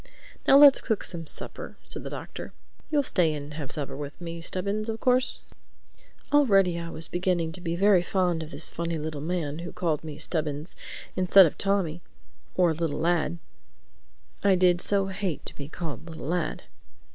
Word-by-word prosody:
"Now 275 - +8
let's 285 -1 +8
cook 220 -4 -1
some 165 -2 -5
supper," - - -5
said - - 0
the - - -6
Doctor.—"You'll 295 -2 -5
stay 170 - +2
and 145 0 -7
have 150 -3 -6
supper 145 -4 -4
with 145 0 -7
me, 170 -1 -6
Stubbins, 200 +5 -2
of 225 0 -3
course?" 255 +1 +1 0.9
Already 195 -11 +4
I 170 0 -5
was 160 0 +4
beginning 175 -2 0
to 180 +2 -9
be 170 -1 -2
very 195 0 +4
fond 180 -2 0
of 155 - -7
this 145 +1 0
funny 170 0 -3
little 155 -1 -5
man 160 -2 -3
who 170 0 -6
called 160 -4 -1
me 155 -2 -7
"Stubbins," 150 0 -3 0.4
instead 185 +1 +7
of 160 - -1
"Tommy" 190 -5 -1 0.5
or 175 -3 +3
"little 155 -2 -2
lad" 170 +1 +1 1.1
(I 200 -1 +5
did 180 -1 +3
so 200 -1 +3
hate 190 -4 -4
to - - -7
be 140 0 -8
called 165 -1 -6
"little 160 -3 -8
lad"!) 170 +1 -2
170 Hz, 170 wpm, -27 LUFS, 160-190 Hz, 1.1 s, Now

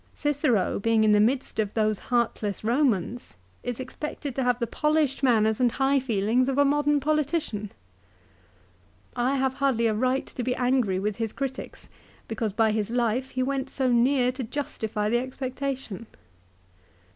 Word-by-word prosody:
Cicero 285 - +1
being 225 +1 +2
in 215 - +4
the 210 - +5
midst 245 +3 +1
of 210 -2 0
those 215 -2 +1
heartless 230 -4 0
Eomans 240 - 0 0.3
is 245 -1 -4
expected 275 +2 -5
to 270 - -1
have 245 -2 +2
the 240 - -1
polished 300 +2 0
manners 220 -5 +3
and 245 -2 +2
high 275 +1 +2
feelings 240 +1 +1
of 270 - -1
a 285 - +5
modern 295 +1 +2
politician! 290 -8 -1 1.4
I 250 +3 +1
have 265 -1 +1
hardly 265 -4 +1
a 220 - +2
right 255 +4 0
to - - -6
be 250 +1 -1
angry 245 -6 +1
with 205 +1 -2
his 225 -2 -2
critics 270 -1 -5 0.4
because 225 -1 -2
by 220 +2 +2
his 215 -1 -1
life 240 +2 0
he 255 -1 -1
went 270 0 -2
so 260 -2 0
near 250 +1 +3
to 260 +1 -5
justify 220 -5 -3
the 240 +3 +2
expectation. 260 -3 -5
250 Hz, 160 wpm, -26 LUFS, 220-270 Hz, 1.4 s, the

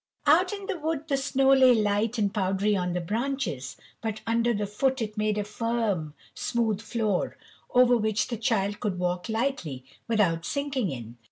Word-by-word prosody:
Out - - +5
in 400 -1 -5
the 385 -4 -3
wood 310 0 -2
the 285 - +1
snow 270 0 +3
lay 260 -2 +7
light 210 +2 +1
and 205 -2 +1
powdery 200 +1 +1
on 180 -2 -1
the 180 - 0
branches, 225 - -3 0.2
but 220 -1 -3
under 230 -2 +1
foot 260 +6 0
it 215 -2 -3
made 210 -1 0
a 210 - 0
firm, 210 -8 -2 0.2
smooth 225 -4 -1
floor, 215 -3 -1 0.3
over 250 0 +5
which 215 -2 +1
the 235 - -3
Child 205 -2 0
could 200 -4 -2
walk 180 +2 -2
lightly 220 - -2 0.2
without 195 -8 +2
sinking 275 - -1
in. 120 -3 -7
215 Hz, 170 wpm, -27 LUFS, 195-250 Hz, 0.3 s, lay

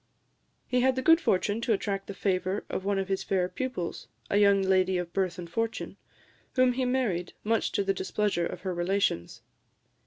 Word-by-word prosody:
He 250 - +1
had 260 0 +3
the 260 - -2
good 325 +4 +6
fortune 205 +4 +1
to 235 -1 +2
attract 195 -1 -2
the 200 - -6
favour 190 0 -1
of - - -2
one 200 0 0
of 195 -1 -1
his 195 -1 -1
fair 185 -2 0
pupils 250 -6 -4 0.2
a 200 - +3
young 200 -1 +5
lady 190 -1 +3
of 175 -1 -4
birth 185 -3 0
and 175 -1 -6
fortune 225 +6 -3 0.6
whom 255 -1 +4
he 260 +1 0
married, 230 -9 0
much 225 +1 +1
to 200 - +1
the 195 0 +1
displeasure 190 -2 -1
of 175 - -8
her 185 -1 -2
relations. 175 - -1
195 Hz, 190 wpm, -28 LUFS, 185-225 Hz, 0.6 s, good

